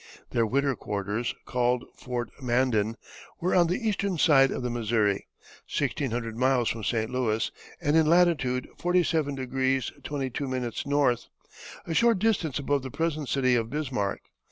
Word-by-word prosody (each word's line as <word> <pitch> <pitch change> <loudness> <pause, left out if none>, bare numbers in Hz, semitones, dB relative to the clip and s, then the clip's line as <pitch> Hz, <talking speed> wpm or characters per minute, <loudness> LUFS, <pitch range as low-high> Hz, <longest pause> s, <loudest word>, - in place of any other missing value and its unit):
Their 115 -1 +2
winter 140 +3 +1
quarters, 105 +3 -3
called 125 0 0
Fort 120 -3 -4
Mandan, 120 -3 +1 0.4
were 180 - 0
on 175 -2 +5
the 220 +7 -1
eastern 200 -3 0
side 135 -4 +5
of 130 - -3
the 125 - -1
Missouri, 110 -4 0 0.4
sixteen 140 - -1
hundred 115 -1 -3
miles 125 -1 +2
from 115 -1 -4
St. 110 +1 -1
Louis, 115 -3 0 0.3
and 150 -2 +1
in 160 -1 +5
latitude 155 -7 +3
47° 135 -7 0
22´ 130 -2 -3
N., 140 -5 +3 0.7
a 165 - -3
short 230 +4 +4
distance 185 - +1
above 140 -1 0
the 130 - -6
present 155 0 -2
city 130 -2 +2
of 115 -2 +1
Bismarck. 125 -8 -2
130 Hz, 145 wpm, -27 LUFS, 120-150 Hz, 0.7 s, on